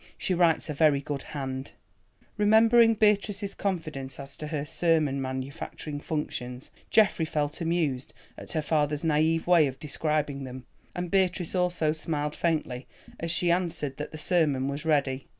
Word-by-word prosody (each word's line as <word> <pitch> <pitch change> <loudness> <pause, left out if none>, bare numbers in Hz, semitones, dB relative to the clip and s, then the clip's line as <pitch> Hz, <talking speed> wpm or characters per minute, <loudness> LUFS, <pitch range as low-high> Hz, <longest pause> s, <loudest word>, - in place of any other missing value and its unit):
She 185 - -1
writes 170 -2 +3
a 150 - -3
very 150 -1 +4
good 140 -1 -4
hand——" 135 -2 -5 0.6
Remembering 225 +2 +5
Beatrice's 205 -1 +1
confidence 155 -9 -4
as 140 0 -8
to 150 - -6
her 150 -2 -3
sermon 155 -3 +1
manufacturing 135 +3 -5
functions, 130 -5 -4 0.2
Geoffrey 210 -6 +4
felt 150 +1 -2
amused 160 -6 -1 0.2
at - - -8
her 155 -2 0
father's 150 0 0
naïve 160 +1 +2
way 170 -4 +5
of 130 -1 -6
describing 150 -2 -1
them, 130 0 -8 0.3
and 180 -1 -4
Beatrice 185 -3 +1
also 180 -4 +1
smiled 150 -1 -3
faintly 150 -7 -1 0.3
as 165 - -3
she 170 +1 +2
answered 170 -6 -1
that 150 - -5
the 155 - -7
sermon 155 -5 +1
was 140 +3 -4
ready. 140 -4 +1
155 Hz, 150 wpm, -27 LUFS, 140-175 Hz, 0.6 s, Remembering